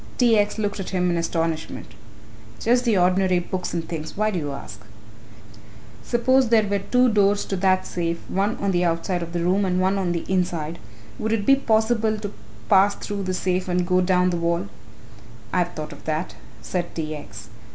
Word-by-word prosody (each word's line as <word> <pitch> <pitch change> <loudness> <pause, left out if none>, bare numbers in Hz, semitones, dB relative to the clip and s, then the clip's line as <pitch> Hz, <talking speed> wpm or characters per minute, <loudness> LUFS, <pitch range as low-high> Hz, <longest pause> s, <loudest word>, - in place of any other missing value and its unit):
T. 240 -3 +4
X. 210 0 +1
looked 205 -1 -2
at 190 - -4
him 180 -2 +1
in - - 0
astonishment. 165 -1 -2 0.7
"Just 245 +2 +2
the 225 -4 +3
ordinary 185 +1 +3
books 180 +1 -3
and 165 -2 -3
things. 160 0 -6
Why 215 +1 +1
do 185 - -1
you 145 -2 -4
ask?" 110 -6 -8 1.2
"Suppose 255 +1 +2
there 225 -2 +4
were 200 0 0
two 250 +6 +3
doors 205 -2 +2
to 195 - -2
that 185 0 +2
safe, 170 -2 -2
one 200 +4 0
on 200 -1 0
the 175 -1 +1
outside 175 +1 0
of 170 0 -5
the 170 0 -2
room 190 +3 +2
and 185 -1 +1
one 190 +2 +2
on 180 -2 0
the 170 -1 -3
inside, 170 -3 -1 0.4
would 220 0 -1
it 210 -3 -1
be 275 - +6
possible 220 -3 +1
to 205 -1 -6 0.3
pass 200 0 +5
through 205 -1 -5
the 185 0 -1
safe 185 0 -1
and 180 0 +1
go 180 0 +3
down 180 0 +2
the 175 - -1
wall?" 170 -10 -1 0.8
"I - - +2
have 175 0 -1
thought 155 -1 -6
of - - -14
that," 155 +2 -2 0.3
said 175 -2 -3
T. 155 -1 -3
X. 110 -7 -10
185 Hz, 200 wpm, -23 LUFS, 170-205 Hz, 1.2 s, be